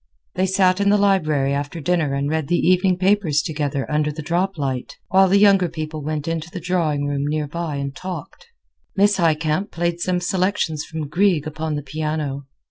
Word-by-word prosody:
They 190 Hz, +1 st, +1 dB
sat 190 Hz, 0 st, +2 dB
in 200 Hz, -, +3 dB
the 205 Hz, -, +5 dB
library 155 Hz, -9 st, +2 dB
after 145 Hz, +4 st, -3 dB
dinner 155 Hz, -3 st, 0 dB
and 140 Hz, +1 st, -1 dB
read 155 Hz, -1 st, -1 dB
the 175 Hz, -, +2 dB
evening 185 Hz, 0 st, +3 dB
papers 185 Hz, -6 st, +2 dB
together 145 Hz, -3 st, -2 dB
under 150 Hz, 0 st, 0 dB
the 155 Hz, +1 st, -7 dB
droplight; 160 Hz, -7 st, -2 dB
while 190 Hz, 0 st, +5 dB
the 195 Hz, -, +5 dB
younger 195 Hz, -3 st, +5 dB
people 155 Hz, -1 st, -5 dB
went 150 Hz, 0 st, -3 dB
into 165 Hz, 0 st, -3 dB
the 180 Hz, -, -6 dB
drawing 165 Hz, -5 st, 0 dB
room 140 Hz, 0 st, -1 dB
near 150 Hz, 0 st, -1 dB
by 165 Hz, 0 st, -4 dB
and 140 Hz, 0 st, -4 dB
talked. 185 Hz, -, -8 dB, 0.5 s
Miss 200 Hz, 0 st, +3 dB
Highcamp 160 Hz, +2 st, +1 dB
played 170 Hz, 0 st, -2 dB
some 180 Hz, +1 st, 0 dB
selections 180 Hz, -4 st, -1 dB
from 160 Hz, -2 st, -5 dB
Grieg 170 Hz, -1 st, +2 dB
upon 155 Hz, 0 st, -3 dB
the 145 Hz, -, -4 dB
piano. 150 Hz, -2 st, -3 dB
160 Hz, 185 wpm, -21 LUFS, 150-185 Hz, 0.5 s, the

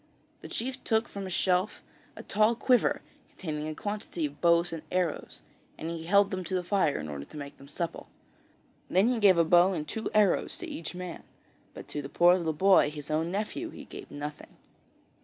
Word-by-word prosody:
The -, -, -8 dB
chief 260 Hz, +2 st, -4 dB
took 220 Hz, 0 st, +1 dB
from 195 Hz, -1 st, -6 dB
a -, -, -6 dB
shelf 185 Hz, +2 st, 0 dB, 0.3 s
a -, -, -9 dB
tall 215 Hz, +3 st, +3 dB
quiver 250 Hz, +1 st, +2 dB, 0.3 s
containing 155 Hz, -4 st, -5 dB
a 155 Hz, -, -4 dB
quantity 205 Hz, -5 st, -3 dB
of 145 Hz, 0 st, -7 dB
bows 170 Hz, 0 st, +4 dB
and 165 Hz, -, -5 dB
arrows, 180 Hz, -3 st, -2 dB, 0.4 s
and 165 Hz, -, -4 dB
he 165 Hz, -1 st, -6 dB
held 200 Hz, +3 st, +4 dB
them 185 Hz, -1 st, -3 dB
to 190 Hz, -, -2 dB
the 180 Hz, -, 0 dB
fire 180 Hz, -5 st, +1 dB
in -, -, -5 dB
order 70 Hz, -1 st, -6 dB
to -, -, -12 dB
make 140 Hz, -1 st, -7 dB
them 140 Hz, -, -13 dB
supple. 165 Hz, +3 st, -5 dB, 0.8 s
Then 190 Hz, +6 st, +4 dB
he 250 Hz, -2 st, +1 dB
gave 195 Hz, -4 st, +6 dB
a 170 Hz, -, +4 dB
bow 175 Hz, +3 st, +5 dB
and 155 Hz, -4 st, -4 dB
two 220 Hz, -, -3 dB
arrows 210 Hz, -3 st, +3 dB
to -, -, -7 dB
each 165 Hz, +2 st, -6 dB
man, 180 Hz, -2 st, -6 dB, 0.5 s
but -, -, -9 dB
to 145 Hz, -, -3 dB
the 140 Hz, -, -7 dB
poor 175 Hz, +3 st, +5 dB
little 170 Hz, -3 st, -1 dB
boy, 185 Hz, 0 st, +5 dB
his 150 Hz, 0 st, -8 dB
own 160 Hz, +2 st, 0 dB
nephew, 215 Hz, -, -3 dB
he -, -, -10 dB
gave -, -, -10 dB
nothing. 150 Hz, +1 st, -8 dB
175 Hz, 205 wpm, -29 LUFS, 155-200 Hz, 0.8 s, gave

